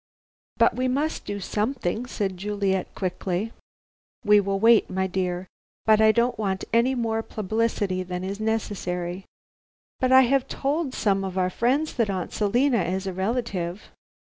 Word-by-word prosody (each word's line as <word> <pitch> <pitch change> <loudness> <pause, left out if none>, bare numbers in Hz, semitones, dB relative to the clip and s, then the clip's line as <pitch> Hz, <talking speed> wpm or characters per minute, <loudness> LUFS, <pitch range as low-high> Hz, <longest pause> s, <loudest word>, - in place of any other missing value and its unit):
"But - - +4
we 255 +1 0
must 290 +5 -1
do 205 0 -4
something," 220 +2 -2
said 200 -6 -2
Juliet 195 0 -2
quickly. 185 +3 -2 0.7
"We 210 0 +6
will 195 0 -1
wait, 225 +1 +5
my 190 0 -1
dear. 185 -1 -2 0.4
But 220 -1 +5
I 220 0 +7
don't 235 0 +1
want 190 -3 -1
more 230 -2 +2
publicity 215 -3 -1
than 180 0 -5
is 195 +2 -4
necessary." 190 -5 -2 0.7
"But 255 -1 +1
I 260 0 +9
have 265 +1 +2
told 285 0 -2
some 195 -2 +1
of 190 -1 -4
our 185 0 +1
friends 270 +10 +1
that 230 -4 0
Aunt 185 -3 -3
Selina 235 +3 +2
is 185 +3 -2
a 190 - -3
relative." 190 -2 -3
210 Hz, 150 wpm, -25 LUFS, 190-235 Hz, 0.7 s, I